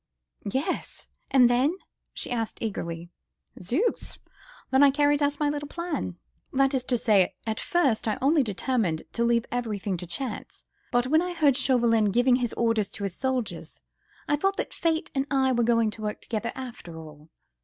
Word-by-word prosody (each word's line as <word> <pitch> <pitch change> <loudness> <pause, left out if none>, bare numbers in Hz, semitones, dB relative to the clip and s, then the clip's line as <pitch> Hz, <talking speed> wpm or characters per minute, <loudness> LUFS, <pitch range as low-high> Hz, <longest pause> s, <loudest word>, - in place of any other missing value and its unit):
"Yes!—and 265 0 0
then?" 255 +7 +2 0.4
she - - -5
asked 230 -2 -2
eagerly. 170 -5 -4 0.5
"Zooks!—then 285 - -2
I 285 - +8
carried 290 +1 +2
out 285 0 +1
my 300 - +2
little 290 0 -2
plan: 305 - -4 0.3
that 270 +1 +2
is 260 -2 +1
to 250 - +1
say, 205 -5 +3
at 220 -1 -2
first 285 - +1
I 215 - 0
only 290 +3 +4
determined 210 -6 -1
to 235 - 0
leave 235 0 +2
everything 210 -6 -2
to 180 +1 -7
chance, 220 +6 -5 0.3
but 245 0 +2
when 315 +5 +3
I 360 0 -3
heard 295 -5 +4
Chauvelin 235 -5 +3
giving 245 +5 +3
his 245 -3 -2
orders 225 -4 +1
to 200 - -5
the 200 - 0
soldiers, 250 +4 -3 0.5
I 295 - +2
thought 390 +6 0
that - - -3
Fate 325 -1 -1
and 270 0 -1
I 265 -2 +2
were 240 -1 +2
going 230 -2 +3
to 215 - -9
work 210 0 -3
together 230 +1 -3
after 240 -10 -8
all. 155 -1 -12
245 Hz, 170 wpm, -26 LUFS, 215-280 Hz, 0.5 s, I